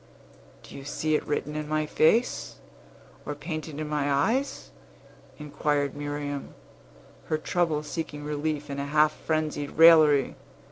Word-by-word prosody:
"Do - - -12
you 140 - -8
see 155 +2 -2
it 150 - +1
written 150 0 -2
in 155 -1 -4
my 155 0 0
face, 215 +11 +1 0.7
or 145 - -5
painted 155 0 -6
in 155 - -3
my 145 -1 -1
eyes?" 230 - 0 0.7
inquired 145 -1 -1
Miriam, 145 -1 -5 0.7
her 155 - 0
trouble 155 -1 0
seeking 150 -1 -5
relief 150 0 -3
in 140 - -4
a 140 - -3
half 150 +1 +4
frenzied 155 -2 -2
raillery. 155 -4 +6
150 Hz, 135 wpm, -27 LUFS, 145-155 Hz, 0.7 s, raillery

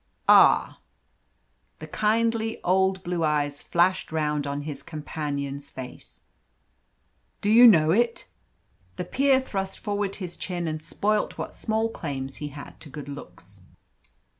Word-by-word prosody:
"Ah!" - - +6 1.0
The - - -8
kindly 225 +1 0
old 190 +1 +2
blue 175 -1 -2
eyes 145 -2 0
flashed 175 +1 +1
round 150 -2 -1
on 140 +1 -3
his 150 -1 -6
companion's 145 -2 -5
face. 130 -1 -10 1.2
"Do 205 - 0
you 240 +2 +9
know 160 -8 +6
it?" 235 +4 +1 0.7
The - - -4
peer 270 +6 +3
thrust 195 -7 -4
forward 205 -2 -2
his 180 -3 -7
chin 175 -2 -3
and 155 -1 -3
spoilt 210 +6 -1
what - - -5
small 220 0 -1
claims 135 -10 -5
he 150 - -5
had 145 0 -10
to 150 - -12
good 145 0 -8
looks. 140 0 -11
175 Hz, 135 wpm, -26 LUFS, 145-210 Hz, 1.2 s, you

